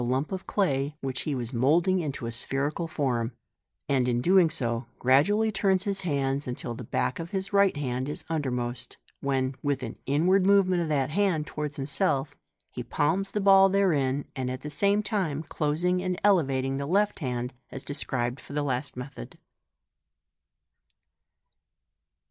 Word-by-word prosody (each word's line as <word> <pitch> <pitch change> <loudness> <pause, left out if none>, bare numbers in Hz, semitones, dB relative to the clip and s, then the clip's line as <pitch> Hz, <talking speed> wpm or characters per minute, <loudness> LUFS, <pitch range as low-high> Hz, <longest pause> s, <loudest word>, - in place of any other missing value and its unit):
urap 130 +4 -1
of 190 0 -5
clay 145 -7 0
which 130 -1 -3
he 150 - -2
was 120 0 -4
moulding 165 +10 +3
into 145 -7 -4
a 115 - -3
spherical 140 +7 -1
form} 130 -7 -1 0.6
and 130 -3 +2
.n 120 0 0 0.3
so 145 -6 0
doing 120 - -11
gradually 200 - +3
turns 195 -2 +1
his 200 -1 -2
hands 140 -5 -1
till 120 - -5
the 120 - -7
back 125 - -1
of 165 0 -5
his 195 +2 -4
right 200 -5 +4
hand 130 -1 -2
is 150 - -5
undermost, 125 -5 -3 0.2
when, 135 -1 0
with 140 -2 -1
an 115 - -5
inward 175 +8 +3
movement 190 -2 +4
of 165 - -2
that 140 -2 0
hand 175 -4 +1
towards 150 -2 -5
himself, 140 0 0 0.4
he - - -5
palms 195 +7 0
the 210 - -2
ball 195 -1 +6
therein, 145 -9 +1
at 130 -1 -3
the 150 - -6
same 200 +6 +2
time 170 -9 -1
closing 165 +5 0
and 185 0 -2
elevating 135 -9 +2
the 140 0 -3
left 205 +5 +1
hand, 125 -3 -3 0.2
as 135 - -7
described 130 -3 -2
for - - -11
the 145 0 0
last 130 -1 -2
method. 125 - -8
145 Hz, 160 wpm, -27 LUFS, 130-185 Hz, 0.6 s, ball